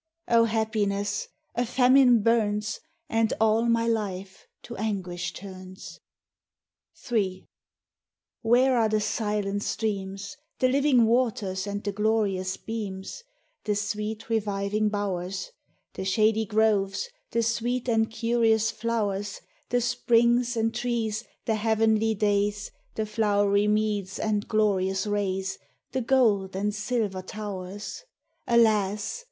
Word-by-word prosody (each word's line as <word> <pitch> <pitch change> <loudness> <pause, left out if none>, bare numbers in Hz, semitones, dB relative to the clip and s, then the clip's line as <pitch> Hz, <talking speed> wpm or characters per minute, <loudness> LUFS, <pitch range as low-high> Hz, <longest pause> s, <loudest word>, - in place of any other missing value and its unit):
O 230 -1 +5
Happiness! 210 -3 -1 0.3
A 240 - 0
famine 250 -1 +5
burns, 215 -2 +1 0.3
And 225 -1 +1
all 220 +1 +3
my 230 0 +2
life 195 -4 -3 0.2
to 240 - -8
anguish 185 -4 -3
turns! 185 -1 -10 1.1
Ill 190 -5 0 1.0
Where 245 +2 +4
are 220 -1 +3
the 215 0 +2
silent 205 -2 -1
streams, 200 -2 -3 0.2
The 255 - +3
living 270 -3 +4
waters 215 -5 0
and 205 0 -4
the 205 - -1
glorious 200 -3 0
beams, 215 - -6 0.4
The 210 - +1
sweet 210 +1 -3
reviving 210 -1 0
bowers, 195 - -3 0.4
The - - -5
shady 215 +3 +2
groves, 210 - +1 0.2
the 230 - 0
sweet 240 +2 -1
and 225 -2 +2
curious 225 -1 +2
flowers, 205 -3 -2 0.3
The 245 0 +2
springs 240 +1 +2
and 225 0 +1
trees, 230 -2 -2 0.2
the 225 - +1
heavenly 220 0 +2
days, 205 0 0 0.2
The 220 - -1
flow'ry 205 -1 +2
meads, 210 -2 0
and 210 -1 -1
glorious 195 -3 +1
rays, 195 -2 -2 0.3
The 260 0 -1
gold 220 -7 +2
and 205 +2 -1
silver 215 -3 -2
towers? 205 - -6 0.4
Alas 215 - +2
215 Hz, 115 wpm, -26 LUFS, 200-230 Hz, 1.1 s, O